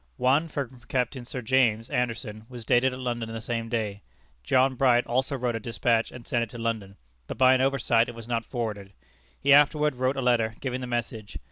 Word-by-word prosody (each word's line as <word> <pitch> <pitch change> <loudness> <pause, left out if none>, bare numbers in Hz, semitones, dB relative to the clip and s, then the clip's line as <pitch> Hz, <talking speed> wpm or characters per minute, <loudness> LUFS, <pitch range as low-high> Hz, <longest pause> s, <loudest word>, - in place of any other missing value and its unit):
One, 140 +6 +2
from 135 -5 -5
Captain 125 0 -2
Sir 125 +1 -6
James 115 -2 +2
Anderson, 115 -4 -3
was 120 -3 -9
dated 125 +2 +3
at 125 - -6
London 120 -3 -3
the 115 - -5
same 115 0 -3
day. 105 -3 -2 0.4
John 130 - +3
Bright 125 -2 +3
also 130 +3 -1
wrote 120 -2 -1
a - - -2
despatch 115 0 0
and 120 -2 -11
sent 120 - 0
it 115 - -2
to 120 - -9
London, 110 -4 -3 0.3
but - - -6
by 130 0 +6
an 130 - +2
oversight 125 -4 +2
it 120 - -8
was 115 -1 -9
not 115 -1 -1
forwarded. 105 -6 -5 0.5
He 140 0 +4
afterward 150 +1 +4
wrote 130 +2 0
a - - -1
letter, 115 -3 +2
giving 130 -1 -3
the 125 - -5
message. 115 -3 -4
120 Hz, 210 wpm, -26 LUFS, 115-130 Hz, 0.5 s, by